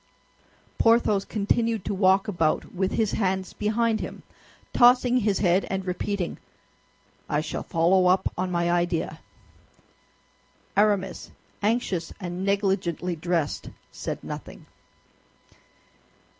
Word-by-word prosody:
Porthos 225 -3 +4
continued 225 0 0
to 205 - -1
walk 190 0 +3
about 165 -6 0
with 190 0 -1
his 220 -3 +1
hands 190 -2 -1
behind 220 +1 0
him, - - -7 0.5
tossing 250 0 +5
his 210 -4 +1
head 185 0 +3
and 190 -1 -2
repeating, 185 0 -3 0.9
"I 150 - +1
shall - - -4
follow 180 +3 +3
up 185 +1 +2
on 185 +1 -2
my 170 -1 0
idea." 175 -1 -1 1.6
Aramis, 200 -2 +1 0.3
anxious 205 -6 0
and 180 -1 -5
negligently 190 -3 0
dressed, 165 -2 -2 0.2
said - - -5
nothing. - - -8
190 Hz, 105 wpm, -25 LUFS, 175-210 Hz, 1.6 s, tossing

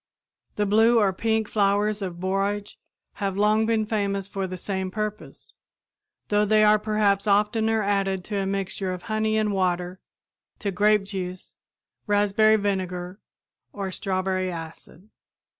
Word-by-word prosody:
The 210 - 0
blue 225 +4 +4
or 200 -4 +3
pink 220 +2 0
flowers 205 0 +1
of 180 -3 -5
borage 195 +2 -2 0.4
have 195 -1 -1
long 215 +2 +3
been 225 -1 +1
famous 200 -3 -1
for 195 -1 -3
the 185 0 -6
same 190 0 -3
purpose, 215 +2 -6 0.8
though 210 0 +3
they 215 +1 +4
are 210 0 +5
perhaps 210 -1 +1
oftener 220 +2 +2
added 195 -2 0
to 205 +2 -4
a 195 -1 -1
mixture 195 -1 -3
of 180 - -7
honey 215 -1 0
and 215 -1 +1
water, 180 -1 -1 0.6
to 200 - -3
grape 210 +2 +3
juice, 185 -2 -6 0.5
raspberry 205 +1 +4
vinegar 185 -2 -2 0.5
or 195 -2 -4
strawberry 185 -1 -1
acid. 165 +4 -10
200 Hz, 140 wpm, -25 LUFS, 190-215 Hz, 0.8 s, are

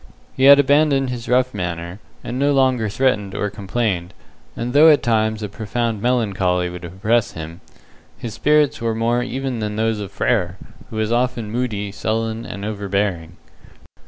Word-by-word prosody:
He 130 - +2
had 140 +1 +9
abandoned 140 -2 +3
his 120 -2 -6
rough 130 +1 +2
manner, 90 -1 -4 0.2
and 125 - -4
no 145 +1 +3
longer 130 -5 +2
threatened 105 -4 0
or 105 - -2
complained, 100 -3 -2 0.4
and 120 +1 -3
though 155 +3 +8
at 150 -2 +4
times 110 -2 +1
a - - -2
profound 110 +1 -3
melancholy 95 -7 0
would 90 0 -9
oppress 105 +6 0
him, 80 +2 -8 0.6
his 115 -3 -6
spirits 150 +3 +2
were 115 -1 -1
more 120 +2 +1
even 130 0 -3
than 105 -1 -3
those 110 0 0
of 100 -1 -6
Frere, 95 -4 0 0.3
who - - -9
was 110 0 -1
often 120 -3 0
moody, 110 -4 -2
sullen, 110 +2 -2
and 100 0 -6
overbearing. 100 -5 -2
110 Hz, 160 wpm, -20 LUFS, 100-125 Hz, 0.6 s, had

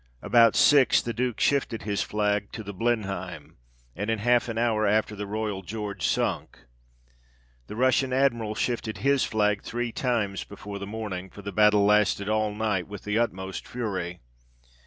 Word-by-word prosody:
About 115 -1 +5
six 140 -3 +5
the 120 - -3
Duke 125 0 -2
shifted 135 -5 +1
his 100 -3 -1
flag 105 +1 -1
to 110 - -6
the 100 0 -7
Blenheim, 95 -7 -3 0.4
and 100 +5 -3
in 115 - +1
half 120 +2 +2
an 115 - -4
hour 110 -2 +1
after 105 +1 +1
the 105 0 -5
Royal 105 -2 -3
George 105 +1 -4
sunk. - - -2 1.0
The - - -7
Russian 130 +2 +2
Admiral 120 -5 +1
shifted 115 -2 -2
his 140 -1 +3
flag 105 -2 +1
three 120 0 -3
times 115 -6 -1
before 100 0 -8
the 100 - -6
morning; 100 -4 -5
for 100 +3 -12
the 100 - -5
battle 105 -1 +4
lasted 105 -1 +3
all 110 0 +1
night 105 -4 -1
with 105 0 -9
the 105 +2 0
utmost 95 -5 -3
fury. 95 -7 -4
105 Hz, 165 wpm, -26 LUFS, 100-115 Hz, 1.0 s, About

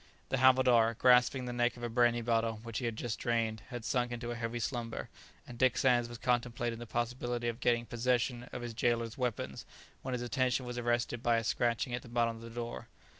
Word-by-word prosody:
The 135 - +1
havildar, 125 -3 +5
grasping 125 +1 +4
the 125 - -4
neck 120 0 +1
of 120 - -10
a - - 0
brandy 120 0 +3
bottle 115 -1 0
which 115 -1 -4
he 125 - -3
had 115 -2 -1
just 115 0 -4
drained, 115 -2 0
had 120 -2 -6
sunk 120 -2 0
into 120 0 -4
a - - -3
heavy 115 0 -3
slumber, 120 -1 -3 0.4
and 120 -1 -11
Dick 130 -1 +3
Sands 120 -3 +3
was 120 - -7
contemplating 120 -1 -1
the 120 - -8
possibility 120 +1 -2
of 115 0 -2
getting 120 -2 +2
posssession 120 +1 -1
of 125 - -6
his 120 -1 -5
gaoler's 115 -1 0
weapons 125 -5 -3 0.4
when 130 - -4
his 125 -1 -2
attention 125 +1 0
was 125 0 -4
arrested 120 0 0
by 120 -1 +3
a 115 - 0
scratching 120 +2 0
at 120 - -2
the - - -13
bottom 115 -1 0
of - - -12
the 115 - -8
door. 120 0 -6
120 Hz, 220 wpm, -32 LUFS, 115-125 Hz, 0.4 s, havildar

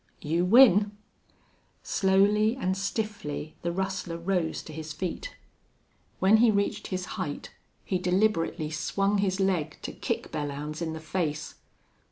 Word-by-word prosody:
"You 165 +4 +1
win!" 205 -2 +6 0.9
Slowly 205 +4 +3
and 190 -8 -1
stiffly 195 -7 -3
the 170 - -1
rustler 185 -2 -3
rose 170 -1 -1
to 155 - -10
his 155 0 -6
feet. 185 - -5 0.8
When 200 +3 +5
he 235 +1 +5
reached 200 -1 0
his 185 -1 -3 0.2
height 145 -5 -5 0.3
he 185 - 0
deliberately 180 -4 +1
swung 195 +6 0
his 195 -1 0
leg 190 -6 0
to - - -4
kick - - -3
Belllounds 150 +1 -4
in 160 -1 -2
the 160 - -5
face. 155 -1 -3
185 Hz, 135 wpm, -28 LUFS, 160-200 Hz, 0.9 s, win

